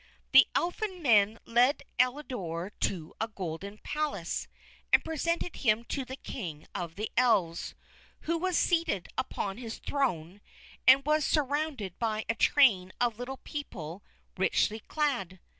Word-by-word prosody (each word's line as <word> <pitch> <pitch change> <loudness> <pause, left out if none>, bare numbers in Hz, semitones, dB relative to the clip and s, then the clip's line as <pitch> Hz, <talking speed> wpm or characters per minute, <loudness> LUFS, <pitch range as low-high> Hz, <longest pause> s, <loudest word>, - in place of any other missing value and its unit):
The - - +8
Elfin 365 0 -1
Men 215 -4 +5
led 250 +5 +3 0.2
Elidore 245 - -1
to 165 -5 -2
a 225 - +1
golden 195 0 -6
palace, 305 -1 -2 0.4
and - - +5
presented 335 +2 -1
him 220 -2 +2
to 275 - -1
the 260 +1 -7
King 165 - -7
of 170 -2 -5
the 215 +2 -4
Elves, 215 -9 +2 0.5
who 335 - -1
was 370 0 +1
seated 330 - +1
upon 195 0 -3
his 230 -3 -6
throne 200 - -2 0.5
and 270 +1 +8
was 305 0 +3
surrounded 285 - -1
by 220 -2 -1
a - - +1
train 225 -7 +4
of 235 -2 +1
little 265 +2 -5
people 195 - -6 0.4
richly 210 +3 +2
clad. 230 - -2
235 Hz, 135 wpm, -30 LUFS, 195-290 Hz, 0.5 s, The